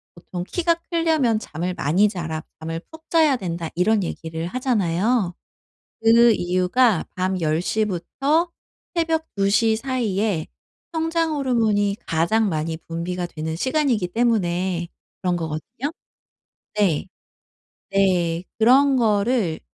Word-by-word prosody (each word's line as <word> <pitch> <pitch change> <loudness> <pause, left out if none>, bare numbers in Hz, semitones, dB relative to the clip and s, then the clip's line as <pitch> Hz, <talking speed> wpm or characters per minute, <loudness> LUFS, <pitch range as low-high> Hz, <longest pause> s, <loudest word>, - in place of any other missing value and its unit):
보통 175 +1 -6
"키가 335 - +1 0.2
크려면 315 -9 +2
잠을 175 -2 -4
많이 180 +9 +3
자라. 160 -5 -4 0.2
잠을 165 +1 -4
푹 320 0 -14
자야 315 -4 +4
된다." 170 -4 -4
이런 205 +5 +3
얘기를 165 -1 -4
하잖아요. 210 -3 0 0.7
그 230 +1 +6
이유가 185 +3 +2
밤 185 0 0
10 155 +1 +1
시부터 220 - 0 0.5
새벽 325 -1 0
2 195 -1 +2
시 220 +2 +3
사이에 220 - -1 0.5
성장 325 0 0
호르몬이 220 -7 +1
가장 170 +7 +2
많이 160 0 -2
분비가 170 +2 -4
되는 160 -1 -4
시간이기 260 - +1
때문에 180 -5 0 0.3
그런 180 -2 +1
거거든요. 165 - -4 0.9
네. 180 -8 +2 0.9
네. 180 -3 +2 0.2
그런 265 +4 +5
거를 210 -6 +1
200 Hz, 235 characters per minute, -22 LUFS, 170-250 Hz, 0.9 s, 그